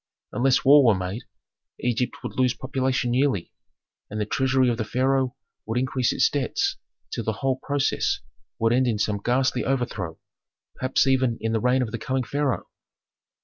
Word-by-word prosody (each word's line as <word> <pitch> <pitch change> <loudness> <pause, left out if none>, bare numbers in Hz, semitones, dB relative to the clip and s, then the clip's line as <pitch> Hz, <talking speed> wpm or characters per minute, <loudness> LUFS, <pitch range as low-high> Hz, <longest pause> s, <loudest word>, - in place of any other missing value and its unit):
Unless 130 +2 +2
war 145 +1 +8
were 115 -5 +5
made, 95 +5 -4 0.5
Egypt 125 0 -1
would - - -5
lose 125 -1 +2
population 130 -1 -1
yearly, 130 -9 +1 0.6
and 105 - -4
the 105 - 0
treasury 130 +3 +2
of 120 -2 +1
the - - +1
pharaoh 130 +3 0 0.3
would 115 +2 -1
increase 130 -1 +1
its - - +3
debts 140 -4 -1 0.4
till - - -2
the 110 - -1
whole 130 -1 +1
process 140 -1 0 0.4
would 115 +1 +2
end 130 +1 +3
in 115 -3 +1
some 105 -1 -1
ghastly 125 0 +1
overthrow, 125 -11 -2 0.6
perhaps 130 +1 +1
even 130 -3 +2
in 110 - -2
the 115 - +1
reign 125 +2 +3
of 110 - -5
the 115 - -4
coming 130 +3 -1
pharaoh. 140 +2 -1
125 Hz, 170 wpm, -25 LUFS, 115-130 Hz, 0.6 s, war